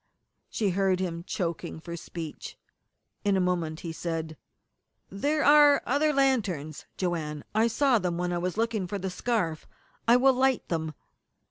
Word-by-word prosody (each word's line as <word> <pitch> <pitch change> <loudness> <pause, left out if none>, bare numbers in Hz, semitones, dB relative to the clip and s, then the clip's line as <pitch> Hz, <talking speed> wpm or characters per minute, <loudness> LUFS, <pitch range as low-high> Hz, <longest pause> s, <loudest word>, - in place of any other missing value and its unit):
She 205 -4 0
heard 190 0 +1
him 170 -2 -3
choking 170 -3 -3
for 170 +1 -7
speech. 165 -2 -7 0.7
In 200 -2 +2
a - - +2
moment 170 -3 -1
he 170 - -5
said: 160 -1 -4 0.8
"There 290 +10 0
are 290 0 +7
other 290 +4 +2
lanterns 205 - 0
Joanne. 160 -5 -2
I 220 +2 +3
saw 250 +1 +3
them 180 -3 -2
when 175 0 -1
I 175 - -1
was 180 +3 -3
looking 225 -4 0
for 205 - -3
the 190 -1 -4
scarf. 180 -7 -1 0.4
I 235 - +7
will 265 +1 +5
light 260 0 +1
them." 160 -2 -2
185 Hz, 155 wpm, -28 LUFS, 165-235 Hz, 0.8 s, are